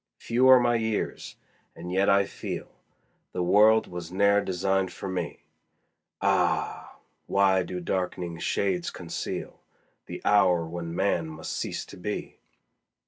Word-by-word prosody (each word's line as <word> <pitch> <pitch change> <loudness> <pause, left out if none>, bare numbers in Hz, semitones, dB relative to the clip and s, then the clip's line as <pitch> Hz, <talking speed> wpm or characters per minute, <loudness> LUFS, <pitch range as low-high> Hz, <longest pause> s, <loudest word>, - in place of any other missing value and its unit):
Few 125 +3 +2
are 130 -1 +9
my 120 -1 +2
years, 110 -2 -3 0.4
and 90 +2 -7
yet 95 +2 +2
I 100 0 +4
feel - - -6 0.6
The 90 - -1
world 105 +5 +5
was 90 -1 -7
ne'er 100 +2 +3
designed 95 0 0
for 90 - -7
me: 95 -1 -4 0.8
Ah! - - 0 0.3
why 95 -1 +3
do 90 0 -5
dark'ning 90 -2 -3
shades 95 -3 0
conceal - - -6 0.5
The - - -6
hour 90 -5 +4
when 85 0 -6
man 90 -4 +1
must 80 0 -7
cease - - -3
to - - -12
be? 105 +3 -5
95 Hz, 135 wpm, -27 LUFS, 90-100 Hz, 0.8 s, are